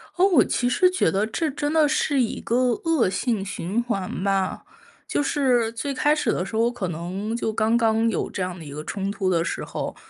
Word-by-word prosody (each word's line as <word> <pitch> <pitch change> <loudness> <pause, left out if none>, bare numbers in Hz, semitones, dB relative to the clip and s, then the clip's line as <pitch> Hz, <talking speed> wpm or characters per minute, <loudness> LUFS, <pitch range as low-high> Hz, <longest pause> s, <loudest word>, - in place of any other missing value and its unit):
哦， 360 - +4
我 350 -10 +5
其 245 - 0
实 365 +8 +4
觉 370 - +2
得 200 +2 +1
这 305 +8 -2
真 290 +1 -2
的 310 -2 +4
是 285 -2 +1
一 230 - -2
个 235 - -1 0.3
恶 325 - +2
性 220 0 -1
循 195 +3 -2
环 195 -6 -3
吧。 195 -1 0 0.4
就 - - 0
是 255 -5 +1
最 275 +5 -3
开 295 +3 +2
始 305 - 0
的 180 - -1
时 220 - -7
候， 225 - +3
我 235 - +2
可 210 -7 -4
能 185 +7 -4
就 230 -1 -1
刚 220 +1 +1
刚 225 0 +2
有 - - -2
这 190 - -5
样 180 -1 -3
的 165 - -10
一 145 - -9
个 150 +2 -6
冲 195 +3 -3
突 200 -2 -1
的 170 -2 +2
时 - - -3
候， - - -5
225 Hz, 250 characters per minute, -24 LUFS, 190-275 Hz, 0.4 s, 我